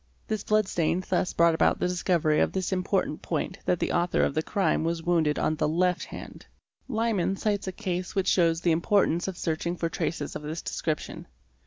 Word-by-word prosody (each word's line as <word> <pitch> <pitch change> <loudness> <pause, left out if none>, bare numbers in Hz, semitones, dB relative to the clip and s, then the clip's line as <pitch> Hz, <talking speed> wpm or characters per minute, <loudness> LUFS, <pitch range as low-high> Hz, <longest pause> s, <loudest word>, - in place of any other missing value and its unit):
This 215 -2 -2
blood 215 -1 +2
stain 175 +1 0
thus 180 0 +1
brought 170 0 +4
about 160 - +3
the - - +1
discovery 170 -4 +1
of - - +2
this 190 0 -2
important 185 -4 0
point - - -3
that 180 - +2
the - - -1
author 175 0 +2
of - - +1
the 155 - +1
crime 185 -2 0
was 165 0 -1
wounded 160 -4 +2
on 155 - +1
the 150 - +1
left 180 +2 +1
hand. - - -9 0.4
Liman 220 -6 0
cites 205 -1 -1
a - - -1
case 180 0 -4
which 195 -2 +1
shows 165 -2 +3
the 175 - +2
importance 175 0 +2
of 190 -2 -4
searching 170 +1 -2
for 165 0 -1
traces 150 -3 -3
of - - -4
this 155 +2 -5
description. 155 -2 -3
175 Hz, 200 wpm, -27 LUFS, 165-190 Hz, 0.4 s, brought